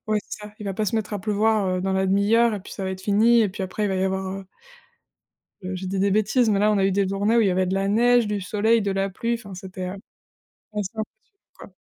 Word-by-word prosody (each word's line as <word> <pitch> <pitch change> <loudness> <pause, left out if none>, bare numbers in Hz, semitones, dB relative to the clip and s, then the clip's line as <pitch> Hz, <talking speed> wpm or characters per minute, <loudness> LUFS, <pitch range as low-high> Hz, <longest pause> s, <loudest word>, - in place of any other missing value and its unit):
ouais 215 0 +1
c'est 210 - -8
ça. 210 0 -11
Il 210 - -8
va 195 - -2
pas 215 0 -1
se 225 - 0
mettre 215 -1 -3
à 205 - -2
pleuvoir, 215 0 +1
heu, 185 0 -1
dans 190 0 -1
la 190 0 +1
demi-heure 215 +4 +3
et 200 - -5
puis - - -11
ça 195 - -6
va 190 - -2
être 190 0 -7
fini 225 +4 +4
et 210 - +1
puis 190 - -6
après 190 +3 -3
il - - +1
va 190 - -1
y 190 - 0
avoir 190 0 -1
heu 190 - -11 1.2
heu, 185 +1 -5
je 190 - -6
dis 190 +1 -2
des 200 +1 +2
bêtises, 215 +4 +2
mais 200 -2 +2
là, 210 +1 +3
on 205 - +1
a 195 - +2
eu 195 - +2
des 200 0 +1
journées 200 +4 +1
où - - +5
il 210 - +3
y - - +3
avait 185 0 +1
de 190 - -1
la 195 0 0
neige, 240 +2 +4
du 205 -1 -2
soleil, 220 +4 +2
de 200 - -1
la 195 0 -1
pluie 235 +5 -2
enfin 200 -4 -8
c'était, 185 0 -6
heu, - - -5 0.8
assez 205 -3 -2
impressionnant, 220 - 0 0.5
quoi. - - -12
200 Hz, 295 wpm, -23 LUFS, 190-215 Hz, 1.2 s, où